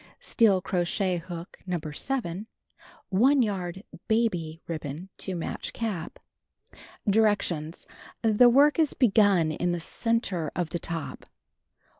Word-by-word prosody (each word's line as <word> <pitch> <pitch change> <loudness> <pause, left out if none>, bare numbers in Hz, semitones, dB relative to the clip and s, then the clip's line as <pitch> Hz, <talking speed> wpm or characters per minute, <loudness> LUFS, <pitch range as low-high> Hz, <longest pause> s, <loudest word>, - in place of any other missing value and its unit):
Steel 205 -6 +3
crochet 180 0 0
hook 170 0 -9
No. 180 -1 -1
7. 175 - -4 0.6
1 255 +8 +4
yard 190 -3 -3 0.2
"baby" 180 -9 0
ribbon 160 +2 -5
to 190 - -3
match 170 - -5
cap. 205 -8 -4 0.9
Directions: 200 -7 +1 0.4
The 225 +2 +6
work 285 +6 +5
is 315 -3 +2
begun 200 - +4
in 175 +3 -1
the 175 - -2
center 190 -4 -1
of 175 -2 -1
the 170 - -2
top. 165 -1 -5
185 Hz, 115 wpm, -27 LUFS, 170-220 Hz, 0.9 s, The